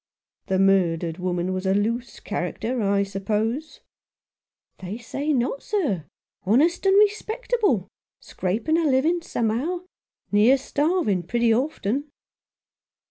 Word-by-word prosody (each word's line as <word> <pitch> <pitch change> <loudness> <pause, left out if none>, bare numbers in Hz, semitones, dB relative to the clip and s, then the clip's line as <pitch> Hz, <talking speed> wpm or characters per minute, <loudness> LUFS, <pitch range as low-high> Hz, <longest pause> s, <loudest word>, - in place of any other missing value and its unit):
"The 190 - +1
murdered 175 -3 +2
woman 180 0 -1
was 185 +1 -3
a 190 - +3
loose 230 +4 -1
character, 220 +6 -3
I 200 -1 +2
suppose? 215 +8 -2 0.5
" - - -54
"They 190 +3 -6
say 275 +6 -3
not, 265 0 0
sir 280 - -1 0.2
— - - -55
honest 310 - +2
and 385 +1 +5
respectable 425 - +1 0.2
— - - -71
scraping 220 - -1
a - - +1
living 310 +7 +2
somehow 265 +6 -1 0.2
— - - -51
near 215 +6 +5
starving 285 - 0
pretty 230 +6 +1
often." 265 0 -1
230 Hz, 130 wpm, -24 LUFS, 195-310 Hz, 0.5 s, and